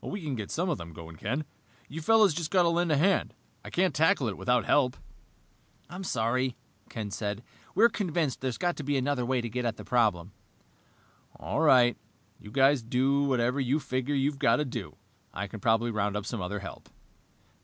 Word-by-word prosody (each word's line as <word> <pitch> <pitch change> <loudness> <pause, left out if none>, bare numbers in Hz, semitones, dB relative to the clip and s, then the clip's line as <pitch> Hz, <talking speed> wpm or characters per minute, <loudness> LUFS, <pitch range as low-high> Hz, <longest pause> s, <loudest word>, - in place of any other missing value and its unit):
"We 200 -3 -5
can 150 -3 -3
get 105 -5 -5
some 175 +3 -1
of 170 - -1
them 85 -1 -9
going, 80 0 -10
Ken. 130 - -2 0.4
You 160 +4 -7
fellows 215 -1 +4
have 165 -2 -3
got 185 -2 +4
to 170 - +3
lend 170 0 +1
a 150 - +3
hand. 190 +6 +2 0.3
I - - -8
can't 185 +1 +1
tackle 150 -4 +3
it 100 - -5
without 125 -1 +1
help." 130 -4 +2 0.9
"I'm 185 +2 -6
sorry," 125 -2 0 0.3
Ken 105 -3 -5
said. 105 +2 -4 0.3
"We're 230 - +7
convinced 170 - -2
there's 130 -2 -2
got 175 -1 0
to 150 - -5
be 145 0 0
another 135 -1 0
way 130 -1 +1
to 120 - -4
get 125 +2 -3
at 115 -2 -2
the - - -9
problem." 105 -7 +1 1.0
"All 90 - -3
right. 125 -6 +5 0.4
You 105 - -12
guys 135 +3 +3
do 135 +5 +1
whatever 125 0 +1
you 135 +3 +1
figure 130 0 -2
you've 140 +1 0
got 115 - +4
to 150 - 0
do. 120 -7 -6 0.4
I 100 - -3
can 110 +2 -8
probably 115 +3 +2
round 105 -1 -1
up 105 - -5
some 115 -4 -4
other 95 +3 -4
help." 95 - -10
130 Hz, 200 wpm, -28 LUFS, 110-150 Hz, 1.0 s, We're